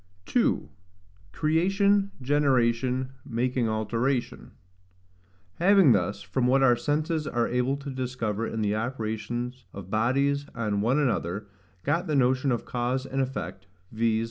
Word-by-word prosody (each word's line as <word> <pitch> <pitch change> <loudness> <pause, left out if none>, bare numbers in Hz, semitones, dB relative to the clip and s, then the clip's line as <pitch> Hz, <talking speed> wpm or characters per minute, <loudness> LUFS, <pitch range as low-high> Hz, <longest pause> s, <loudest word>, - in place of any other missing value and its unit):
2. - - +1 0.6
Creation 195 - +2
Generation, 130 -2 +1
making 125 0 -1
Alteration. 115 - -1 1.1
Having 190 -4 +6
thus, 100 -1 +1
from 125 -2 0
what 135 +2 +4
our 125 -2 +6
senses 150 +5 -1
are 120 -4 0
able 125 +3 0
to 140 0 -7
discover 120 -4 -2
in 110 -1 -2
the 105 0 +1
operations 120 +2 -3
of 95 -1 -9
bodies 140 +6 +1
on 105 -3 -1
one 120 +6 +2
another, 105 - 0 0.4
got 170 +6 0
the 155 - 0
notion 130 +1 +2
of 120 - -1
cause 125 +2 -2
and 135 0 -1
effect, 130 -7 -5 0.2
viz. 110 0 +1
125 Hz, 130 wpm, -27 LUFS, 115-140 Hz, 1.1 s, Having